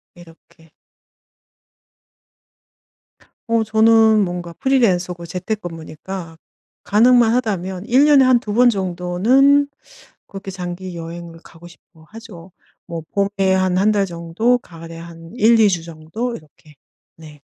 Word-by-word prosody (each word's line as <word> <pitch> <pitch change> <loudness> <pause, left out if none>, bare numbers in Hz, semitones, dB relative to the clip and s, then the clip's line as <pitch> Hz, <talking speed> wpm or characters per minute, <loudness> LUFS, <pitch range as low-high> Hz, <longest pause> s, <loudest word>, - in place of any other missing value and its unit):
이렇게 165 -1 -19 2.8
어 230 -1 +1
저는 220 -1 +4
뭔가 175 -1 -6
프리랜서고 180 -10 0
재택근무니까 175 -2 -7 0.5
가능만 230 +2 +4
하다면 190 -5 -3
1 260 +4 +4
년에 285 -3 +5
한 255 -1 +4
2 210 -3 -6
번 245 +2 +5
정도는 205 +9 +2 0.6
그렇게 195 0 -9
장기 180 -1 -7
여행을 165 0 -9
가고 170 +1 -15
싶어 165 -1 -22
하죠. 210 -6 -13 0.4
뭐 165 -1 -6
봄에 200 -1 0
한 185 -1 +1
1 210 +3 +3
달 200 -2 +1
정도 175 +8 -1
가을에 165 -6 -12
한 165 0 -12
1-2 225 -2 +4
주 175 -4 -2
정도 170 +10 -6
이렇게. 155 0 -19 0.4
네. 150 -3 -15
185 Hz, 220 characters per minute, -19 LUFS, 170-225 Hz, 2.8 s, 년에